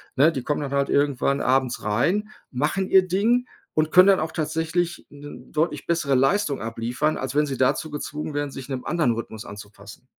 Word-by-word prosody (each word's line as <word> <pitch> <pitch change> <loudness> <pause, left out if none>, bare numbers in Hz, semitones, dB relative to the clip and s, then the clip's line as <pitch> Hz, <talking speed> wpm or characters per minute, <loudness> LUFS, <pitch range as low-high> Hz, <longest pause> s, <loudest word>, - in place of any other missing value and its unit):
ne, 150 +5 +5
die 135 -6 -4
kommen 150 +1 -1
dann 140 - -4
halt 140 0 0
irgendwann 140 -1 +1
abends 130 -1 +1
rein, 170 - 0 0.2
machen 150 +9 -1
ihr 190 -1 +5
Ding 230 +7 +1 0.3
und 155 0 +1
können 185 +1 +7
dann 195 - +5
auch 160 +1 -2
tatsächlich 165 +2 -2
'ne 145 0 -11
deutlich 155 +3 -1
bessere 165 -5 0
Leistung 140 +3 +1
abliefern, 115 +7 -2
als 130 0 -4
wenn 150 - +3
sie 135 -2 -4
dazu 130 +4 +1
gezwungen 150 0 -5
wären, 145 -1 -2
sich 135 0 -9
'nem 130 -2 -4
anderen 160 -9 +1
Rhythmus 110 -1 -6
anzupassen. 105 +3 -12
145 Hz, 190 wpm, -24 LUFS, 130-165 Hz, 0.3 s, können